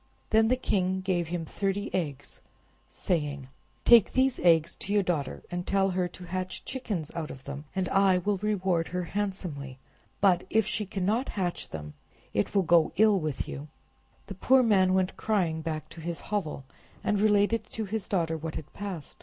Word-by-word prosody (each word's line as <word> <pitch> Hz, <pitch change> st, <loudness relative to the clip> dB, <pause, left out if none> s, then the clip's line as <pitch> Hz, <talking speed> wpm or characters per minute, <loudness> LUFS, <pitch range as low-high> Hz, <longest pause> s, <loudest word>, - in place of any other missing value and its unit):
Then 220 Hz, 0 st, +5 dB
the 255 Hz, -, +3 dB
king 190 Hz, -6 st, 0 dB
gave 180 Hz, -3 st, 0 dB
him 170 Hz, -1 st, -3 dB
thirty 200 Hz, +5 st, -2 dB
eggs, 145 Hz, -6 st, -3 dB, 0.5 s
saying— 145 Hz, -6 st, -2 dB, 0.4 s
"Take 235 Hz, -4 st, +7 dB
these 260 Hz, 0 st, +2 dB
eggs 165 Hz, -2 st, +4 dB
to 200 Hz, -, -6 dB
your 205 Hz, -1 st, +3 dB
daughter, 155 Hz, -7 st, -2 dB
and 175 Hz, 0 st, -4 dB
tell 195 Hz, -1 st, +2 dB
her 180 Hz, -1 st, 0 dB
to 180 Hz, +1 st, -12 dB
hatch 185 Hz, +1 st, -4 dB
chickens 210 Hz, -, -3 dB
out 165 Hz, -2 st, -4 dB
of 135 Hz, -, -9 dB
them, 140 Hz, +2 st, -7 dB
and 190 Hz, -1 st, 0 dB
I 195 Hz, -1 st, +4 dB
will 200 Hz, +3 st, 0 dB
reward 190 Hz, -5 st, 0 dB
her 180 Hz, 0 st, -2 dB
handsomely; 175 Hz, -9 st, -4 dB, 0.4 s
but 185 Hz, -3 st, +4 dB
if 220 Hz, -1 st, +3 dB
she 210 Hz, -1 st, -1 dB
cannot 205 Hz, +7 st, 0 dB
hatch 180 Hz, -3 st, -2 dB
them, 75 Hz, -1 st, -7 dB, 0.4 s
it 105 Hz, -, -1 dB
will 195 Hz, -, +4 dB
go 170 Hz, -2 st, +4 dB
ill 215 Hz, -2 st, +5 dB
with 155 Hz, -4 st, -3 dB
you." 145 Hz, +2 st, -6 dB, 0.6 s
The 200 Hz, -, -7 dB
poor 255 Hz, +7 st, +4 dB
man 190 Hz, -5 st, +4 dB
went 190 Hz, 0 st, 0 dB
crying 180 Hz, -7 st, 0 dB
back 155 Hz, -1 st, -4 dB
to 165 Hz, -, -11 dB
his 170 Hz, +1 st, -4 dB
hovel, 155 Hz, -9 st, -2 dB, 0.4 s
and 210 Hz, -1 st, +1 dB
related 210 Hz, +1 st, +2 dB
to 220 Hz, -, -3 dB
his 205 Hz, 0 st, -4 dB
daughter 165 Hz, -4 st, +1 dB
what 160 Hz, 0 st, -5 dB
had 150 Hz, -, -7 dB
passed. 195 Hz, -7 st, -7 dB
185 Hz, 180 wpm, -28 LUFS, 160-205 Hz, 0.6 s, Take